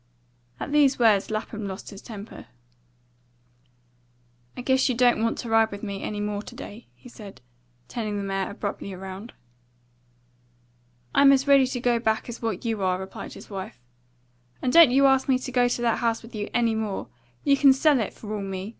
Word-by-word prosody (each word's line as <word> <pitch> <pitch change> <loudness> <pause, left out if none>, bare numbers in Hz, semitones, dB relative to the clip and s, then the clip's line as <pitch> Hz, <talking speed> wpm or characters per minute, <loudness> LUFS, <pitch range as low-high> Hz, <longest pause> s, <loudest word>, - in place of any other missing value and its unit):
At - - -5
these 285 -2 +4
words 215 -5 +3
Lapham 215 -1 -4
lost 190 +2 -7
his 200 - -11
temper. 215 -2 -10 2.1
"I - - -4
guess 260 +1 +2
you 250 - 0
don't 245 -2 +3
want 230 0 0
to 235 - -6
ride 225 0 +4
with 200 0 -9
me 200 -2 -5
any 210 - -4
more 205 0 -2
to - - -12
day," 220 +4 -10
he - - -16
said, 210 - -12 0.5
turning 215 -3 -4
the 200 - -3
mare 195 -1 -2
abruptly 200 -2 -5
round. 190 +4 -8 1.8
"I'm 280 0 +6
as 275 0 +2
ready 275 -2 +6
to 250 -1 -4
go 240 -1 +1
back 220 -1 -1
as 235 - -7
what 225 -2 -3
you 225 -3 -1
are," 185 -1 +1
replied 190 0 -8
his - - -13
wife. 190 -10 -7 0.8
"And 250 - -1
don't 335 -4 +9
you 275 +3 +4
ask 270 0 +3
me 260 - +4
to 255 0 -7
go 245 -1 +3
to 245 - -2
that 230 -2 +1
house 230 -1 0
with 230 - -13
you 210 -1 -4
any 235 -2 +1
more. 220 -3 -3 0.4
You 280 -2 +4
can 275 0 +6
sell 275 +1 +3
it, 215 - -2
for 215 -1 -8
all 205 - -4
me. 195 0 -5
225 Hz, 195 wpm, -25 LUFS, 205-255 Hz, 2.1 s, don't